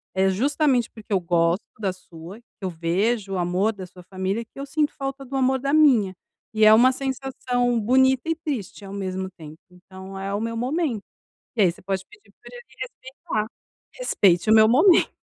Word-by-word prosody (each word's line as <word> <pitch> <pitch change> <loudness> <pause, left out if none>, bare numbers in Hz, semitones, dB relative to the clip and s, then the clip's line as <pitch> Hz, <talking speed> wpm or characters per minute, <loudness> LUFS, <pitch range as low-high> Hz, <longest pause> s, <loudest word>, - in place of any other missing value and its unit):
É 190 0 +3
justamente 260 - +1
porque 220 -1 -15
eu 190 - +3
gosto 170 +1 +1
da 195 -3 -1
sua, 180 +2 -12
que - - -27 0.2
eu 185 - -1
vejo 195 +5 -1
o 190 - -1
amor 180 +5 0
da 190 -2 -8
sua 180 0 -15
família 190 +5 -3
que 230 - -15
eu 280 - -4
sinto 295 +1 0
falta 275 0 -5
do 270 +1 -7
amor 265 0 +2
da 275 +2 -2
minha. 240 -12 +4 0.4
E 215 0 +4
é 215 - +8
uma 250 +4 +6
sensação 255 -2 -1
bonita 260 +5 +3
e 325 - +1
triste 275 - -5
ao 195 - -9
mesmo 190 -1 -4
tempo, 155 0 -11
então 190 +1 -11
é 195 +1 -4
o 205 - -1
meu 230 0 -3
momento". 255 - -1 0.5
E - - 0
aí 180 - +5
você - - -17
pode 190 0 -3
pedir 420 -1 -20
pra - - -12
ele 485 0 -11 0.2
respeitar: 265 - -5 0.5
"Respeite 195 - +2
o - - +7
meu 220 0 +7
momento." 330 - +5
220 Hz, 195 wpm, -23 LUFS, 190-265 Hz, 0.5 s, é